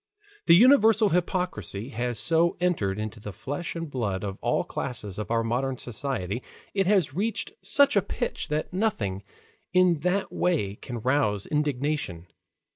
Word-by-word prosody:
The 170 - +8
universal 225 -1 +6
hypocrisy 175 - -2
has 120 -2 -3
so 170 - +2
entered 155 - 0
into 110 +1 -5
the 105 0 -7
flesh 145 - -5
and 165 0 -4
blood 105 -9 -2
of 100 -1 -5
all - - +1
classes 105 -5 -5
of 105 - -4
our 115 0 +1
modern 130 +3 -1
society, 120 -4 -3 0.3
it 195 -2 +1
has 185 -9 +3
reached 215 +7 -2
such 280 -3 +4
a 200 - +5
pitch - - -3
that 150 +3 -2
nothing 115 - -1 0.5
in 180 -3 +4
that 180 +5 0
way 125 - 0
can 120 -3 -6
rouse 125 -6 +1
indignation. 145 - -1
145 Hz, 150 wpm, -26 LUFS, 110-180 Hz, 0.5 s, The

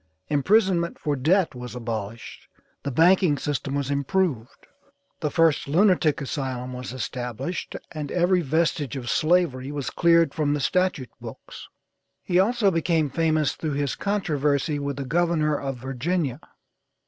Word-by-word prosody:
Imprisonment 170 +3 +2
for 150 -2 -1
debt 165 +7 +2
was 125 0 -8
abolished, 115 -2 -6 0.3
the 140 - -3
banking 165 +2 +4
system 140 0 -3
was 140 -1 -1
improved, 140 - -1 0.5
the 150 - -1
first 165 -3 +2
lunatic 165 -1 +3
asylum 130 -2 -4
was 125 -1 -6
established, 130 +5 -4 0.2
and 150 -3 -5
every 180 +1 +2
vestige 155 -2 0
of 125 -3 -3
slavery 155 -6 +1
was 145 -2 -4
cleared 170 -3 +3
from 150 -2 0
the - - -2
statute 180 -4 0
books. - - -10 0.6
He 180 0 +2
also 210 0 +3
became 165 -3 +1
famous 155 -3 +1
through 155 -3 -4
his 140 -1 -1
controversy 150 -7 0
with 140 -1 -3
the 140 - -4
Governor 165 0 +1
of 135 -2 -4
Virginia. 135 +3 -2
150 Hz, 135 wpm, -24 LUFS, 135-170 Hz, 0.6 s, banking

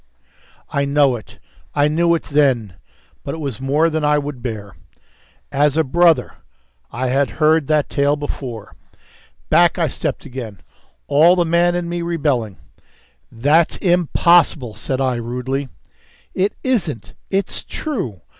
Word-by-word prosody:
I 140 - 0
know 140 -2 +3
it. 110 - -11 0.4
I 145 0 +3
knew 170 +2 +2
it 165 - -3
then. 130 - +1 0.5
But - - -4
it - - -7
was 140 -7 -5
more 145 +5 +2
than 160 -1 -2
I 150 0 +3
would 145 -3 -5
bear. 105 -5 -6 0.8
As 145 +1 +2
a 160 - +4
brother! 170 +3 +2 0.5
I 125 +2 -2
had 135 +2 +1
heard 155 -1 +3
that 155 -2 +2
tale 140 +1 +1
before. 130 -7 -6 0.8
Back - - +4
I - - +1
stepped - - -4
again, 115 -7 -8 0.4
all 165 +5 +5
the 175 -1 +1
man 170 +1 +2
in 175 -1 -2
me 175 0 -3
rebelling. 145 - -1 0.7
"That's 145 +8 +2
impossible," 170 - +2
said 130 +5 -4
I 130 -2 0
rudely. 125 +3 -3 0.6
"It 195 +2 0
isn't. 180 - -2 0.2
It's 195 0 -1
true. 190 - -5
145 Hz, 140 wpm, -19 LUFS, 130-165 Hz, 0.8 s, all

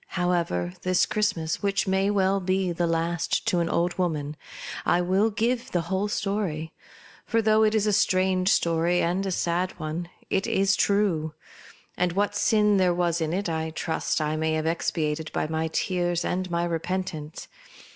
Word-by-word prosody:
However, 170 - 0
this 185 -1 +2
Christmas, 165 -7 -1
which 200 0 0
may 190 +1 +2 0.3
be 185 0 0
the 170 0 0
last 165 +1 -1
to 195 -6 +1
an 170 0 0
old 175 +1 0
woman, 155 -4 -1 0.5
I 175 - +2
will 190 +5 +2
give 235 +3 -1
the 175 - 0
whole 190 +4 -1
story; 195 -7 -2 0.5
for 230 - 0
though 215 0 +3
it 215 0 +3
is 215 -1 +2
a 210 - +2
strange 185 -1 +2
story, 170 0 +2
and 180 +3 0
a - - -1
sad 175 +1 -1
one, 160 +2 -4 0.2
it 195 - +1
is 195 0 +2
true; 180 -7 +1 0.6
and 180 -1 +1
what 205 +2 0
sin 210 -1 +3
there 180 -2 +3
was 170 -1 0
in 160 -1 -1
it 195 +3 -1
I 160 -1 -2
trust 160 +1 -2
I 155 0 -1
may 160 0 0
have 155 0 -1
expiated 160 -1 -1
by - - 0
my 160 +1 -1
tears 175 -2 0
and 185 0 -2
my 170 0 0
repentance. 170 -2 -3
175 Hz, 170 wpm, -26 LUFS, 165-195 Hz, 0.6 s, though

